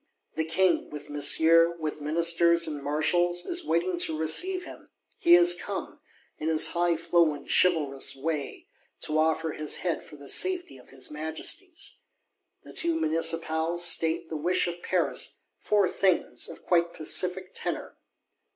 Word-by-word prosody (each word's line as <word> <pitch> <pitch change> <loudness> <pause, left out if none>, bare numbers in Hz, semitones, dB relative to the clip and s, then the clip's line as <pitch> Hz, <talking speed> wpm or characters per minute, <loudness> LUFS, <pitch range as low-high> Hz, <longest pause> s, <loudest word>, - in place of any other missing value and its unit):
The 160 - -1
King, 180 +2 +1
with 150 0 -10
Monsieur, 165 +3 +4
with 155 -2 -5
Ministers 170 +2 +3
and 150 -3 -5
Marshals, 175 +4 0
is 350 0 -3
waiting 175 - -1
to 160 -2 +1
receive 360 - 0
him: - - -12 0.3
He 345 -4 +6
'is 350 0 +6
come,' - - -6 0.4
in 155 - -2
his 160 -1 +4
highflown 170 -3 0
chivalrous 150 -7 +2
way, 145 +1 -5 0.3
'to 155 0 0
offer 160 0 0
his 150 0 -1
head 175 - -1
for - - -14
the 140 -1 -13
safety 355 - +1
of 125 - -19
his 130 +1 -4
Majesty's.' 160 - -3 0.6
The - - -13
two 335 -1 0
Municipals 165 - 0
state 165 0 0
the 160 - -5
wish 175 +5 +2
of 175 0 -5
Paris: - - -1 0.2
four 205 -3 +1
things, 190 -1 0
of - - -11
quite 170 -1 +1
pacific 180 +4 +1
tenor. - - -5
165 Hz, 145 wpm, -27 LUFS, 155-175 Hz, 0.6 s, He